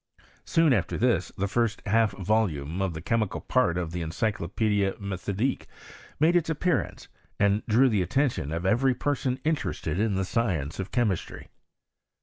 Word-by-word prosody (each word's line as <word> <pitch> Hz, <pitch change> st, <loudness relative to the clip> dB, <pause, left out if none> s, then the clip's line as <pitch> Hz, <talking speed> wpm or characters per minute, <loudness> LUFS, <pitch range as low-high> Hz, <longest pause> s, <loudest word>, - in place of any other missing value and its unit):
Soon 165 Hz, -4 st, +3 dB
after 95 Hz, -8 st, 0 dB
this 110 Hz, -8 st, +1 dB
the 100 Hz, -, 0 dB
first 115 Hz, +1 st, 0 dB
half 110 Hz, 0 st, +3 dB
volume 95 Hz, -5 st, -1 dB
of 95 Hz, -4 st, -1 dB
the 80 Hz, -, -7 dB
chemical 110 Hz, 0 st, 0 dB
part 110 Hz, -10 st, +1 dB
of 85 Hz, -3 st, -3 dB
the 90 Hz, 0 st, -4 dB
Encyclopedic 100 Hz, +3 st, -1 dB
M^thodique 100 Hz, +5 st, -2 dB, 0.5 s
made 165 Hz, +4 st, +4 dB
its 170 Hz, -2 st, +2 dB
appearance, 165 Hz, +2 st, -1 dB, 0.3 s
and 100 Hz, +1 st, +3 dB
drew 120 Hz, +4 st, +5 dB
the 105 Hz, -6 st, +2 dB
attention 115 Hz, -, 0 dB
of 85 Hz, +1 st, -3 dB
everf 125 Hz, +7 st, +2 dB
])cr8oii 130 Hz, -1 st, -1 dB
interested 145 Hz, -, -1 dB
in 105 Hz, -2 st, +1 dB
the 95 Hz, 0 st, 0 dB
science 90 Hz, -, -1 dB
of 95 Hz, -, -3 dB
chemistry. 110 Hz, -8 st, -2 dB
105 Hz, 150 wpm, -27 LUFS, 90-125 Hz, 0.5 s, drew